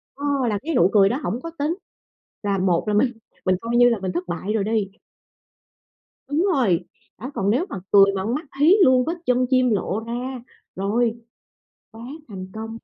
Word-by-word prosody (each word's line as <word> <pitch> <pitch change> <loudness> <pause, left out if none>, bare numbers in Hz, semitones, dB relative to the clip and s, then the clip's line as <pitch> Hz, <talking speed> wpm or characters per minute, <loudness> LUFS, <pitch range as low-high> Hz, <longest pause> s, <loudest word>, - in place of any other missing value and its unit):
ơ, 285 - -6 0.2
là 205 - -1
cái 320 +3 -3
nụ 175 +3 +4
cười 195 -2 +5
đó 255 - -1
hổng 240 - -3
có 330 - -7
tính 300 +4 0 0.7
là 200 -1 0
một 185 -2 +1
là 210 - 0
mình 240 +5 +3 0.3
mình 185 - +3
coi 230 +1 -2
như 245 0 +7
là 230 -4 0
mình 185 -1 -3
thất 180 +1 -4
bại 180 +4 -3
rồi 215 - 0
đi. 210 -2 0 1.4
Đúng 305 +6 +1
rồi, 195 - +2 0.3
đó, 260 +5 -7
còn 195 +1 0
nếu 260 - +1
mà - - -5
cười 200 -1 +8
mà 190 - -2
con 225 +4 -1
mắt 310 - -5
hí 320 +7 +6
luôn, 255 -3 +4
vết 335 +3 -2
chân 250 0 +2
chim 255 -1 +3
lộ 205 -1 -1
ra, 245 +3 -5 0.3
rồi, 225 +4 0 0.8
quá 225 +1 -11 0.2
thành 190 -4 -8
công. 225 +1 -6
225 Hz, 200 wpm, -22 LUFS, 195-255 Hz, 1.4 s, cười